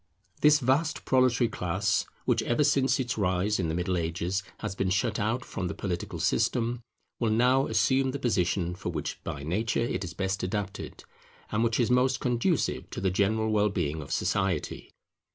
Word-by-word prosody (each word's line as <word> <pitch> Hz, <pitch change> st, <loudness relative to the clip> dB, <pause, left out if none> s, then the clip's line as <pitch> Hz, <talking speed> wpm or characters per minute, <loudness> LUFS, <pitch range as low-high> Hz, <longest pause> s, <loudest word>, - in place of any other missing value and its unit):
This 150 Hz, 0 st, +7 dB
vast 145 Hz, +4 st, 0 dB
proletary 130 Hz, -2 st, +3 dB
class, 100 Hz, 0 st, 0 dB, 0.2 s
which 120 Hz, -3 st, +2 dB
ever 120 Hz, +6 st, +1 dB
since 135 Hz, -1 st, +3 dB
its 120 Hz, -4 st, -2 dB
rise 95 Hz, +2 st, +1 dB
in 85 Hz, -, 0 dB
the 80 Hz, -, -1 dB
Middle 90 Hz, +1 st, 0 dB
Ages 85 Hz, +3 st, -2 dB, 0.2 s
has 105 Hz, -3 st, -3 dB
been 95 Hz, 0 st, -1 dB
shut 105 Hz, +4 st, 0 dB
out 115 Hz, +4 st, -1 dB
from 95 Hz, -, -4 dB
the -, -, -4 dB
political 90 Hz, -3 st, -4 dB
system, 120 Hz, 0 st, +1 dB, 0.4 s
will 115 Hz, -, +1 dB
now 125 Hz, +5 st, +3 dB
assume 130 Hz, +5 st, +2 dB
the 135 Hz, -, -2 dB
position 90 Hz, -8 st, 0 dB
for 90 Hz, -, -5 dB
which -, -, -4 dB
by 70 Hz, -, -5 dB
nature 105 Hz, +9 st, 0 dB
it 105 Hz, -5 st, -1 dB
is 85 Hz, -, -7 dB
best 95 Hz, +1 st, -1 dB
adapted, 100 Hz, 0 st, -4 dB, 0.5 s
and 110 Hz, +2 st, +1 dB
which 115 Hz, +1 st, +1 dB
is 120 Hz, 0 st, +2 dB
most 125 Hz, 0 st, +3 dB
conducive 125 Hz, +7 st, 0 dB
to -, -, -5 dB
the 95 Hz, -1 st, +1 dB
general 110 Hz, +3 st, +1 dB
well 105 Hz, -1 st, +3 dB
being 80 Hz, -6 st, -2 dB
of 70 Hz, -, -9 dB
society. 95 Hz, -5 st, -1 dB
105 Hz, 180 wpm, -28 LUFS, 95-125 Hz, 0.5 s, This